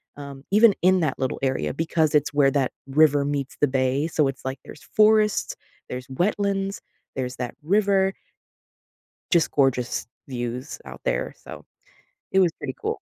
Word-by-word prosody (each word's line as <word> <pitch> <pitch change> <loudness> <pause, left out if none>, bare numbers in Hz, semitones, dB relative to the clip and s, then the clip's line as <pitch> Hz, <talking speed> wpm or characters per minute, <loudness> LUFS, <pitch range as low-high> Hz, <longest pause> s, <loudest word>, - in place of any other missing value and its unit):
um, 140 -1 -9
even 215 0 +6
in 185 0 +4
that 150 -4 -1
little 130 -1 -2
area 130 -1 0
because 160 0 0
it's 150 0 +2
where 140 -2 +4
that 135 -3 0 0.2
river 145 0 +4
meets 140 -2 -3
the 145 - +4
bay. 130 +3 0
So, 150 -3 +1
it's 135 0 -8
like, 130 0 -4
there's 150 - -12
forests, 215 0 +3 0.4
there's 125 +1 -6
wetlands, 195 +5 -1 0.4
there's 125 -1 -3
that 125 -1 -4
river 195 +2 +2 1.2
just 170 -3 +3
gorgeous 130 -3 +1 0.2
views 125 +1 -5
out - - -10
there. - - -1
So, - - -11 0.7
it 190 - +4
was 175 -3 +4
pretty 130 -2 -5
cool. - - -2
145 Hz, 155 wpm, -24 LUFS, 135-190 Hz, 1.2 s, even